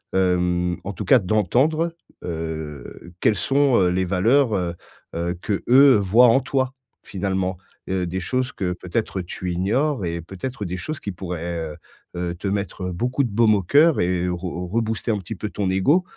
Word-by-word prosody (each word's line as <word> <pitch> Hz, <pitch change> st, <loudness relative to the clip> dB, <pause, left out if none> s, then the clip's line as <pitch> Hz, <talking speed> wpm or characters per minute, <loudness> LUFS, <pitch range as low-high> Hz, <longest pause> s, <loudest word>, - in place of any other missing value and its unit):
heu, 90 Hz, -1 st, +1 dB
en 100 Hz, -, -5 dB
tout -, -, -6 dB
cas 135 Hz, -, +6 dB
d'entendre, 130 Hz, -, +1 dB, 0.3 s
heu, 80 Hz, -1 st, -6 dB
quelles 110 Hz, -, +3 dB
sont, 135 Hz, 0 st, +2 dB
heu, 90 Hz, -2 st, +3 dB
les 95 Hz, +1 st, 0 dB
valeurs, 115 Hz, +7 st, +3 dB
heu 85 Hz, -2 st, -2 dB, 0.4 s
heu, 85 Hz, +1 st, -1 dB
qu'eux, 130 Hz, +7 st, +5 dB
voient 110 Hz, +6 st, +6 dB
en 120 Hz, +4 st, +4 dB
toi, 130 Hz, 0 st, -1 dB, 0.3 s
finalement, 95 Hz, -1 st, -2 dB, 0.3 s
heu, 95 Hz, -1 st, 0 dB
des 95 Hz, +2 st, -3 dB
choses 130 Hz, +8 st, -1 dB
que 90 Hz, -2 st, -2 dB
peut-être, 95 Hz, +2 st, -3 dB
tu 90 Hz, +1 st, -5 dB
ignores 105 Hz, -, 0 dB
et 85 Hz, 0 st, -3 dB
peut-être 105 Hz, +7 st, -6 dB
des 90 Hz, 0 st, -4 dB
choses 150 Hz, -, -5 dB
qui 100 Hz, -, -5 dB
pourraient, 85 Hz, -2 st, -5 dB, 0.2 s
heu -, -, -13 dB, 0.4 s
heu, 85 Hz, -1 st, -2 dB
te 95 Hz, +3 st, -5 dB
mettre 95 Hz, -2 st, -3 dB
beaucoup 125 Hz, +10 st, 0 dB
de 120 Hz, -, -1 dB
baume 110 Hz, +1 st, +4 dB
au 100 Hz, -, -1 dB
cœur 150 Hz, -, +4 dB
et 90 Hz, 0 st, 0 dB
re 90 Hz, 0 st, -4 dB
rebooster 115 Hz, 0 st, -1 dB
un 105 Hz, -, 0 dB
petit 95 Hz, +4 st, -7 dB
peu 105 Hz, +2 st, -5 dB
ton 100 Hz, -3 st, -2 dB
égo, 140 Hz, -, +3 dB
95 Hz, 180 wpm, -22 LUFS, 90-120 Hz, 0.4 s, cas